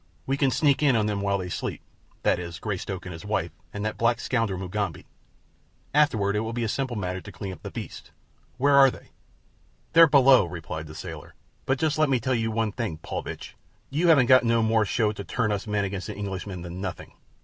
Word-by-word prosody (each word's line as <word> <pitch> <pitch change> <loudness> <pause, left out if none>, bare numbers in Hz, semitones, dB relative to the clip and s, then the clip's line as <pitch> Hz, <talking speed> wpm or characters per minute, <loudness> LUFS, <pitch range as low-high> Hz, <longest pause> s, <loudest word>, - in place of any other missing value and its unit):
We 135 - 0
can 140 -1 +2
sneak 140 +1 +2
in 140 -4 +4
on 110 -2 +2
them 105 -2 -1
while 100 0 +1
they 90 -2 -5
sleep—that 85 - -3
is 85 -2 -6
Greystoke, 95 -1 -4
his 85 -3 -7
wife, 95 -6 -1 0.2
and 105 +1 -4
that 110 - -3
black 115 0 +2
scoundrel, 115 -7 -1
Mugambi. 95 -2 -3 0.9
Afterward 110 -9 +3
it - - +2
will 110 +1 -3
be 120 0 -2
a - - 0
simple 130 +2 -2
matter 95 -2 -3
to 100 - -10
clean 95 +1 -6
up - - -13
the - - -6
beasts. - - -8 0.5
Where 140 +2 +3
are 140 -1 +8
they?" - - -12 0.8
"They're 165 0 +9
below," 135 - +6
replied 80 -2 -6
the 75 - -11
sailor; - - -8 0.3
"but 135 - +2
just 155 +1 0
let 155 -2 +4
me 130 -2 +2
tell 130 +3 -1
you 115 -2 0
something, 110 -5 -2
Paulvitch. - - -6 0.4
You 160 +5 +1
haven't 145 -7 +6
got 130 0 +6
no 115 -1 +2
more 110 -1 +3
show 105 +1 +1
to 100 -1 -7
turn 105 0 -1
us 105 +2 -3
men 105 -1 0
against 95 -1 -4
the 105 - -6
Englishman 95 -2 -5
than 90 +1 -7
nothing. 95 - -6
105 Hz, 210 wpm, -26 LUFS, 95-130 Hz, 0.9 s, They're